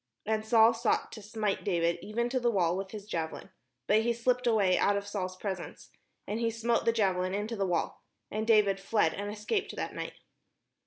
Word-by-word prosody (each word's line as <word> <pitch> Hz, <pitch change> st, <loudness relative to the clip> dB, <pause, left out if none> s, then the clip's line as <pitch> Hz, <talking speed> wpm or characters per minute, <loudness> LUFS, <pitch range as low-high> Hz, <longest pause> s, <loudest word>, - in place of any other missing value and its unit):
And 215 Hz, 0 st, 0 dB
Saul 225 Hz, +1 st, +5 dB
sought 230 Hz, -, 0 dB
to 220 Hz, -, -9 dB
smite 210 Hz, -1 st, -2 dB
David 170 Hz, -3 st, +1 dB
even 235 Hz, +3 st, -1 dB
to 255 Hz, +1 st, 0 dB
the 240 Hz, -1 st, +2 dB
wall 180 Hz, -6 st, +2 dB
with 190 Hz, 0 st, -4 dB
the 215 Hz, -, -6 dB
javelin; 165 Hz, -6 st, -5 dB, 0.3 s
but 215 Hz, +1 st, +4 dB
he 235 Hz, +1 st, +1 dB
slipped 250 Hz, +1 st, 0 dB
away 200 Hz, -5 st, +4 dB
out 200 Hz, +2 st, +3 dB
of 200 Hz, -, -4 dB
Saul's 185 Hz, -3 st, -4 dB
presence, 190 Hz, -3 st, -6 dB, 0.3 s
and 210 Hz, +2 st, -3 dB
he 230 Hz, -1 st, +1 dB
smote 230 Hz, +1 st, 0 dB
the 230 Hz, -, +5 dB
javelin 190 Hz, -4 st, +1 dB
into 210 Hz, +3 st, -3 dB
the 195 Hz, -2 st, 0 dB
wall: 175 Hz, -2 st, -1 dB, 0.3 s
and 215 Hz, +1 st, -2 dB
David 210 Hz, -3 st, +4 dB
fled, 195 Hz, -3 st, +1 dB
and 205 Hz, +1 st, -4 dB
escaped 215 Hz, -, -2 dB
that -, -, -4 dB
night. -, -, -5 dB
210 Hz, 200 wpm, -30 LUFS, 195-230 Hz, 0.3 s, Saul